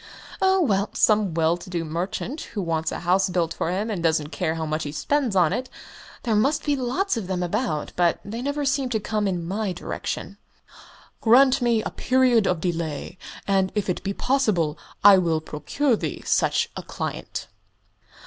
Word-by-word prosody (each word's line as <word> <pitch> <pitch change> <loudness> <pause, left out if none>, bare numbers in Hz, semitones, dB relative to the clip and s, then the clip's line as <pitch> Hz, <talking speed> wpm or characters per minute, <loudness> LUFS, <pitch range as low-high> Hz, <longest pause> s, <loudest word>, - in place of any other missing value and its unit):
"Oh, 380 0 +4
well, 200 - +1
some 210 -6 +3
well 165 +1 +2
to 175 - -11
do 170 -2 -2
merchant 180 - -3 0.2
who - - +1
wants 160 -2 -1
a - - -5
house 185 +2 +2
built 175 -2 0
for - - -2
him 205 +5 -1
and 190 -5 -3
doesn't 160 -2 +1
care 160 0 -1
how 160 -1 -3
much 155 +1 -2
he 145 - -4
spends 265 - 0
on 175 -4 +4
it. 255 +1 -3 0.5
There 230 - 0
must 275 +8 +2
be 290 -1 +2
lots 260 +7 -1
of 205 -5 -4
them 185 -1 -1
about 175 - -2
but 175 -1 +2
they 225 +4 -5
never 285 +2 -2
seem 275 -1 +1
to 225 -3 0
come 210 0 -1
in 175 -3 -2
my 200 +1 -2
direction." 185 +2 -5 0.8
"Grant 255 +3 +5
me 235 -3 +2
a - - -4
period 255 -5 +3
of 180 -3 0
delay, 170 0 -3 0.3
and, 190 -1 +2
if 205 -3 0
it - - -4
be 195 - -2
possible, 200 - +1 0.3
I 200 -1 +9
will 165 -3 +1
procure 160 - -1
thee - - -5
such - - +1
a - - -4
client." - - -5
195 Hz, 185 wpm, -24 LUFS, 170-245 Hz, 0.8 s, I